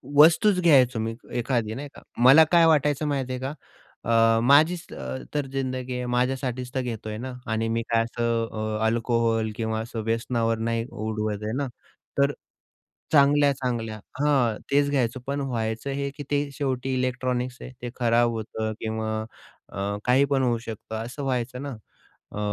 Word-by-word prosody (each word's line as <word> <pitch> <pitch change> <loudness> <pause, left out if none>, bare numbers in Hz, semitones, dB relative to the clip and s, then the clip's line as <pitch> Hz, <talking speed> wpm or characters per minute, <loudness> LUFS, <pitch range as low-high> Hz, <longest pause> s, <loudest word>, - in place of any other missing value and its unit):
वस्तूच 170 +6 +6
घ्यायचो 130 -8 +5
मी 115 +1 -2 0.2
एखादी 115 -3 -1
नाही 145 +2 -6
का. - - -13 0.2
मला 140 +5 +9
काय 170 -1 +6
वाटायचं 150 -1 +3
माहिती 135 -3 -1
आहे 125 - -3
का, 135 +3 -3 0.6
अ, 115 0 +5
माझीच 155 +6 +4
अ, 65 -1 -5 0.2
तर 145 -2 0
जिंदगी 130 -1 -3
आहे. 125 0 -3
माझ्यासाठीच 125 0 -1
तर 130 - +1
घेतो 115 -3 -5
आहे 105 - -4
ना 130 +2 -6 0.2
आणि 110 0 0
मी 115 +1 0
काय 115 0 +3
असं 115 0 -1
अ, 110 0 -3
अल्कोहोल 115 -1 +1
किंवा 110 -1 -2
असं 115 0 -5
व्यसनावर 115 0 0
नाही 115 0 -1
उडवत 105 -1 -3
आहे 110 +1 -2
ना. 140 -1 -1 0.5
तर 140 +1 +4 0.8
चांगल्या 145 -1 +5
चांगल्या 115 -5 -3 0.2
हां, 135 -7 +3 0.2
तेच 140 0 +3
घ्यायचो, 130 -2 0
पण 140 0 -1
व्हायचं 115 0 -2
हे 140 0 -2
की 145 - -5
ते 145 0 +1
शेवटी 135 -2 -2
इलेक्ट्रॉनिक्स 125 0 -1
आहे. - - -8
ते 120 - -3
खराब 120 -1 +3
होतं 110 0 -3
किंवा 110 0 -2 0.4
अ, - - -10 0.3
काही 130 +3 +4
पण 135 -1 +1
होऊ 120 -2 +2
शकतं 110 -1 -7
असं 135 +4 -6
व्हायचं 125 -1 -2
ना. 140 - -4 0.6
अ, 105 - -6
125 Hz, 170 wpm, -25 LUFS, 115-140 Hz, 0.8 s, मला